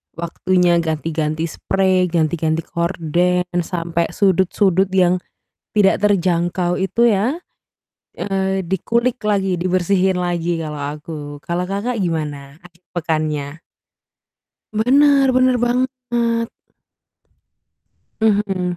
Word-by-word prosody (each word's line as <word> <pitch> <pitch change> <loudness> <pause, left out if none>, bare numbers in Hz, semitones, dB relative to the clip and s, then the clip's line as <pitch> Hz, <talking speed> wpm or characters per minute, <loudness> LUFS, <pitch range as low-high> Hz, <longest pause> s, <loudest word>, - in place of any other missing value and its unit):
waktunya 175 +1 +1
ganti-ganti 160 -1 -2
sprei, 185 +1 +1
ganti-ganti 160 -1 0
gorden, 175 +1 0 0.2
sampai 170 -1 -2
sudut-sudut 190 -1 +2
yang 180 -1 +3 0.6
tidak 200 -1 +3
terjangkau 175 -2 +1
itu 195 +6 +2
ya, 225 - +1 0.8
eee, 190 -1 -1
dikulik 235 +7 0
lagi, 195 -3 +1
dibersihin 185 +1 +1
lagi 175 -1 -1
kalo 155 -1 -5
aku. 150 +2 -6 0.2
Kalo 170 +5 -2
Kakak 225 +5 -2
gimana 150 -4 -4
akhir 175 0 -19
pekannya? 155 -3 -2 1.1
Bener, 275 +5 +4
bener 255 0 +3
banget. 240 -2 0 1.7
Mhm. 195 -5 +1
180 Hz, 90 wpm, -19 LUFS, 165-205 Hz, 1.7 s, Bener